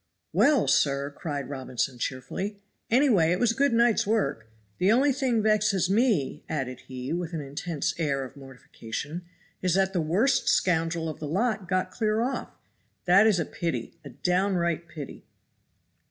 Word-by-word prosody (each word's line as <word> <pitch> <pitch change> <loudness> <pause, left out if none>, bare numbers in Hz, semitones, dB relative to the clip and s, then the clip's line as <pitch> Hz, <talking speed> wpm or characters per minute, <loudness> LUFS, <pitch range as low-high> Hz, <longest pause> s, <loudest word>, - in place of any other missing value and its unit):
"Well, 290 -2 +4
sir," 140 0 +2
cried 145 -5 -4
Robinson 130 -2 -3
cheerfully, 160 - -4 0.3
"any 265 +5 +4
way 170 -10 +4
it 180 - +1
was 240 -2 +3
a - - -3
good 280 +3 +2
night's 235 -3 +3
work. 200 - 0 0.3
The 185 +3 +4
only 270 +4 +4
thing 250 -5 0
vexes 210 -3 +2
me," 210 - +1
added 130 -5 -3
he, 130 +2 -5
with 175 0 -3
an 160 - -2
intense 150 +3 -3
air 140 -4 0
of 130 +1 -10
mortification, 135 +3 -7 0.4
"is 180 -2 +1
that 190 0 +2
the 175 - +1
worst 205 - +2
scoundrel 165 -2 +1
of 155 - -6
the 150 - -5
lot 200 +3 -1
got 185 -1 0
clear 215 +1 0
off; 255 +3 -2 0.6
that 195 +5 +6
is 205 -5 +3
a 165 - 0
pity 170 -1 -4
a 140 - -9
downright 170 +3 0
pity." 155 -4 -9
175 Hz, 165 wpm, -27 LUFS, 145-215 Hz, 0.6 s, that